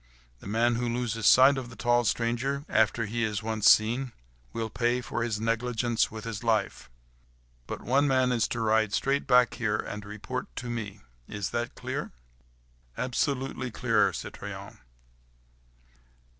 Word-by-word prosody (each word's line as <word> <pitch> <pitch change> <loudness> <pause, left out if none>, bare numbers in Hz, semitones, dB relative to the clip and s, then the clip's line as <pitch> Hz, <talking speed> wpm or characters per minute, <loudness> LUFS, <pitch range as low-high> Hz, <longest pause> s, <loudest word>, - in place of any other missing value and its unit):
The - - -11
man 115 +3 +2
who 120 0 -1
loses 115 -2 -1
sight 135 +2 +7
of 120 -2 -8
the 115 - -12
tall 120 +3 +2
stranger, 120 +6 -1
after 110 +1 +2
he 115 +2 -2
is 105 -1 -2
once 110 -1 +3
seen, 120 +4 +3 0.4
will 115 -1 -4
pay 120 +2 +1
for 120 -1 -4
his 115 -2 -1
negligence 115 +1 0
with 110 -1 -8
his 115 0 -5
life; 110 - 0 0.8
but - - -6
one 140 +4 +2
man 130 -2 +2
is 115 -3 +1
to 115 - -3
ride 110 -1 +2
straight 140 +1 0
back 125 0 +5
here 110 -2 -1
and 105 -1 -5
report 105 +5 -5
to 120 -1 -5
me. 105 -3 -5 0.3
Is 100 -1 -4
that 120 0 -3
clear?" - - -5 0.8
"Absolutely 130 0 -1
clear, 110 - +2
citoyen." - - -8
115 Hz, 150 wpm, -28 LUFS, 110-125 Hz, 0.8 s, sight